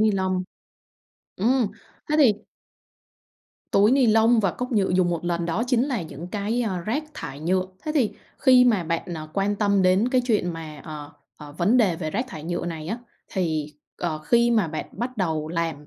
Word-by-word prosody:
ni-lông. 190 -3 +1 0.9
Ừm, 240 +4 +2 0.4
thế 300 - +2
thì 265 -8 +7 1.4
Túi 205 +3 +5
ni-lông 230 -3 +4
và 195 -3 +2
cốc 250 +7 -5
nhựa 200 -3 +2
dùng 180 -1 +2
một 170 -1 -3
lần 170 -1 -1
đó 175 +7 0
chính 245 -2 +2
là 240 -9 -1
những 160 +1 -8
cái, 210 +5 -1
a, 195 -6 -1
rác 230 - -2
thải 145 -3 -7
nhựa. 185 +3 +1 0.2
Thế 305 - -2
thì 255 -8 +2 0.3
khi 255 -2 +6
mà 215 -8 +3
bạn, 170 +2 -2
à, 155 0 -7
quan 200 +2 0
tâm 200 -2 +2
đến 185 +5 +3
cái 255 0 +3
chuyện 210 -7 +1
mà, 155 -3 -8
ờ, 150 -1 -8 0.2
ờ, 145 -1 -11
vấn 200 +8 +3
đề 200 -9 +3
về 155 -2 -4
rác 235 +10 -1
thải 155 -8 -8
nhựa 175 +1 -3
này 160 -2 -5
á, 225 - -2 0.3
thì, 155 -5 -2 0.2
ờ, 165 -3 -2
khi 235 +10 +3
mà 215 -7 +2
bạn 155 0 -4
bắt 250 +2 -4
đầu 160 -6 -1
làm 165 -3 -3
190 Hz, 195 wpm, -24 LUFS, 165-230 Hz, 1.4 s, thì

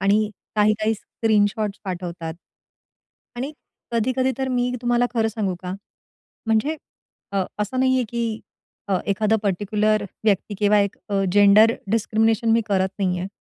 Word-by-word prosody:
आणि 205 +2 +2 0.3
काही-काही 215 +1 +2
स्क्रीनशॉट्स 210 -1 0
पाठवतात 175 -3 -5 1.0
आणि 265 +5 -4 0.4
कधी-कधी 255 +3 +1
तर 265 0 -1
मी 250 -1 0
तुम्हाला 240 0 +2
खरं 225 -1 +2
सांगू 205 -4 -2
का? 180 - -4 0.7
म्हणजे 225 +8 +1 0.6
अ, 195 -1 +1 0.2
असं 210 +5 -1
नाहीये 260 -1 +3
की 230 -1 -2 0.5
अ, 190 -2 +2
एखादा 215 +2 +2
पर्टिक्युलर 210 +2 +1 0.2
व्यक्ती 205 0 +1
किंवा 210 0 +4
एक 200 -1 -1
अ, 200 -1 +1
जेंडर 205 +3 +6 0.2
डिस्क्रिमिनेशन 225 +1 +2
मी 230 - +4
करत 190 -2 +1
नाहीये. 180 -1 0
215 Hz, 130 wpm, -23 LUFS, 200-230 Hz, 1.0 s, जेंडर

